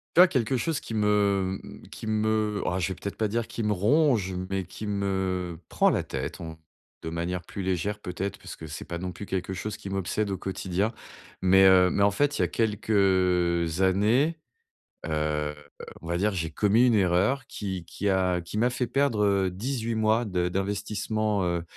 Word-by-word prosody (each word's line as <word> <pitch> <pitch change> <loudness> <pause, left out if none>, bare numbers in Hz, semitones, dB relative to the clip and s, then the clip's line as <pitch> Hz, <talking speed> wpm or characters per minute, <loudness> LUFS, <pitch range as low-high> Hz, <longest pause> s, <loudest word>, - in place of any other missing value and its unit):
Tu - - +5
vois, 185 - +9
quelque 130 -3 0
chose 160 +3 -1
qui 115 - -6
me, 100 -3 +2
mmh, - - -12
qui - - -8
me 110 -1 0
ah, 90 +1 0
je 85 - 0
vais 95 - -3
peut-être 100 +2 -6
pas 110 - 0
dire 115 +2 -2
qui 115 - -5
me 105 -1 +1
ronge 110 - +2 0.2
mais 95 -1 -1
qui 105 - -7
me 95 -4 -1
prend - - +3
la - - +1
tête, - - -5
on 80 -1 -7 0.4
de 80 - -4
manière 85 +2 -3
plus 100 - -7
légère 95 +3 -1
peut-être, 90 +2 -4
parce - - -9
que 80 - -8
c'est 75 - -6
pas 85 - -5
non 90 +1 -5
plus 100 - -8
quelque 95 -1 -3
chose 105 +3 -4
qui 100 - -8
m'obsède 100 +2 -1
au 95 - -2
quotidien 95 +2 -2 0.5
mais 95 +1 +6
heu, 90 -1 +6
mais - - 0
en 100 - +6
fait, 145 +8 0
il - - +3
y - - +4
a - - -1
quelques 95 -6 +1
années, 110 - +3 0.7
heu, 75 -1 -1 0.5
on - - -11
va 85 - 0
dire, 105 +4 +1
j'ai 80 -4 -2
commis 105 +8 +3
une 120 - +4
erreur 100 +7 +2
qui 95 -4 -5
qui 100 +4 -3
a 95 -2 +2
qui 85 +4 -8
m'a 120 +3 +3
fait 125 0 -1
perdre, 135 -6 +2
heu, 100 -2 +2
18 115 +4 -3
mois 110 +2 +2
de 90 -4 0
d'investissement, 100 +2 -1
heu 85 -1 0
100 Hz, 200 wpm, -27 LUFS, 90-110 Hz, 0.7 s, vois